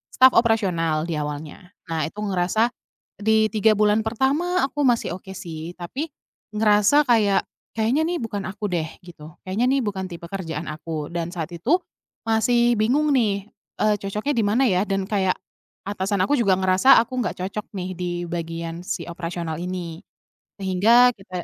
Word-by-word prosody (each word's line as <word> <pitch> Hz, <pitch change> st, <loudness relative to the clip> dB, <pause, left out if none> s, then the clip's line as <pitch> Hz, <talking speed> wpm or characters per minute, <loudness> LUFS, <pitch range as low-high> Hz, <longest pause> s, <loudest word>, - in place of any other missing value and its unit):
staf 260 Hz, 0 st, +7 dB
operasional 180 Hz, -9 st, +2 dB
di 170 Hz, -, -3 dB
awalnya. 150 Hz, +4 st, -6 dB, 0.2 s
Nah, 160 Hz, -2 st, 0 dB
itu 205 Hz, -, -13 dB
ngerasa 200 Hz, +4 st, +1 dB, 0.5 s
di 220 Hz, +1 st, +3 dB
3 215 Hz, 0 st, +3 dB
bulan 210 Hz, +1 st, +3 dB
pertama, 275 Hz, +11 st, 0 dB
aku 290 Hz, +2 st, -4 dB
masih 230 Hz, -7 st, +1 dB
oke 190 Hz, +1 st, -10 dB
sih, 170 Hz, -3 st, -7 dB
tapi 260 Hz, -, -5 dB, 0.4 s
ngerasa 210 Hz, +7 st, +4 dB
kayak 215 Hz, -6 st, +3 dB, 0.3 s
kayaknya 230 Hz, +7 st, +2 dB
nih 350 Hz, 0 st, -1 dB
bukan 205 Hz, -4 st, -4 dB
aku 210 Hz, +2 st, -6 dB
deh, 165 Hz, -3 st, -1 dB, 0.2 s
gitu, 160 Hz, -3 st, -12 dB
kayaknya 200 Hz, +6 st, 0 dB
nih 270 Hz, 0 st, +2 dB
bukan 190 Hz, -2 st, -3 dB
tipe 170 Hz, -1 st, -8 dB
kerjaan 170 Hz, -6 st, -4 dB
aku 155 Hz, -1 st, -5 dB
dan 170 Hz, -1 st, -2 dB
saat 165 Hz, -3 st, -4 dB
itu 280 Hz, -, +1 dB, 0.4 s
masih 235 Hz, +2 st, +3 dB
bingung 265 Hz, +8 st, +2 dB
nih, 210 Hz, -5 st, +1 dB, 0.3 s
eee, 215 Hz, -1 st, +3 dB
cocoknya 210 Hz, +8 st, -2 dB
di 225 Hz, -, +3 dB
mana 230 Hz, +6 st, +2 dB
ya, 185 Hz, -1 st, +2 dB
dan 195 Hz, -1 st, -1 dB
kayak 190 Hz, -3 st, +2 dB, 0.5 s
atasan 200 Hz, -1 st, -1 dB
aku 280 Hz, -, +2 dB
juga 200 Hz, -6 st, +3 dB
ngerasa 190 Hz, +7 st, +5 dB
aku 235 Hz, +3 st, -7 dB
nggak 225 Hz, -, -3 dB
cocok 210 Hz, +2 st, -5 dB
nih, 185 Hz, -2 st, -4 dB
di 180 Hz, -1 st, -3 dB, 0.2 s
bagian 165 Hz, 0 st, -4 dB
si 170 Hz, -1 st, -3 dB
operasional 170 Hz, -2 st, -4 dB
ini, 175 Hz, -2 st, -5 dB, 0.6 s
sehingga 215 Hz, +6 st, +5 dB
kita 185 Hz, -3 st, -7 dB
195 Hz, 160 wpm, -23 LUFS, 175-225 Hz, 0.6 s, staf